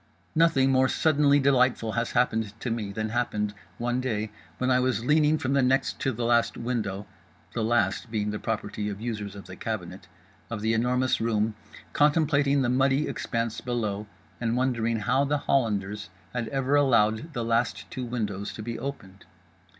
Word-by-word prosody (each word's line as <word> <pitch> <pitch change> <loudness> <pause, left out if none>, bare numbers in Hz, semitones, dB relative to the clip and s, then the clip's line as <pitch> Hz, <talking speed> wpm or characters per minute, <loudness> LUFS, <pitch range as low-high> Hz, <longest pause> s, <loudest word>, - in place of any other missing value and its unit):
Nothing 155 -5 +4
more 130 0 +4
suddenly 145 -2 +3
delightful 130 -4 +3
has 115 +1 -2
happened 110 -3 0
to 120 - -3
me 110 -3 -2
than 110 +2 -3
happened, 105 -3 -1 0.2
one 120 +1 -1
day, 110 -4 -2 0.3
when 130 0 +1
I 125 - +4
was 125 -3 0
leaning 150 +2 +4
from 135 -2 -1
the 140 - +4
next 130 +2 +1
to 135 - 0
the 120 0 -3
last 120 0 +2
window—the 100 -4 -5
last 120 +1 +1
being 105 -2 -1
the 105 - -4
property 105 -2 -3
of 100 -1 -5
users 105 -3 -4
of 100 - -9
the 95 - -9
cabinet—of 105 +2 -7
The 110 +1 +1
Enormous 125 +2 +1
Room, 110 -1 +1 0.4
contemplating 145 -2 +3
the - - +1
muddy 135 +3 +2
expanse 115 -1 -2
below, 110 -4 -2 0.3
and 115 0 0
wondering 115 -3 0
how 135 +6 +2
the 145 +1 +1
Hollanders 105 -7 0 0.2
had 120 -2 -2
ever 135 +4 0
allowed 125 +1 +3
the 120 -3 -2
last 115 +1 0
two 130 - -4
windows 105 -5 -3
to 110 - -7
be 115 +1 -4
opened. 100 -9 -7
120 Hz, 165 wpm, -27 LUFS, 105-130 Hz, 0.4 s, Nothing